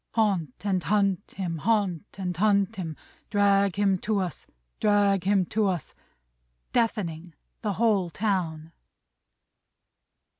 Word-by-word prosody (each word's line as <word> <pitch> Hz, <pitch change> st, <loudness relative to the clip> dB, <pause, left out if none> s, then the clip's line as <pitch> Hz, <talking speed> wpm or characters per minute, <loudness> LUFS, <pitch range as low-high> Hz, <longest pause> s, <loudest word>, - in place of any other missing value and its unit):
"Haunt 190 Hz, -, +1 dB
and 190 Hz, -3 st, +1 dB
hunt 200 Hz, -1 st, 0 dB
him, 170 Hz, -4 st, -3 dB
haunt 205 Hz, -3 st, 0 dB
and 180 Hz, -2 st, -3 dB
hunt 200 Hz, +1 st, +2 dB
him, 165 Hz, -4 st, -4 dB, 0.3 s
Drag 200 Hz, -2 st, +3 dB
him 195 Hz, -2 st, +2 dB
to 215 Hz, +2 st, -1 dB
us, 185 Hz, -4 st, -3 dB, 0.3 s
drag 200 Hz, -3 st, +3 dB
him 195 Hz, -2 st, +3 dB
to 215 Hz, +3 st, 0 dB
us!" 180 Hz, -6 st, -2 dB, 0.8 s
Deafening 180 Hz, -8 st, -1 dB, 0.3 s
the 210 Hz, -3 st, -1 dB
whole 205 Hz, -5 st, +2 dB
town! 165 Hz, -5 st, -2 dB
195 Hz, 115 wpm, -26 LUFS, 175-205 Hz, 0.8 s, Drag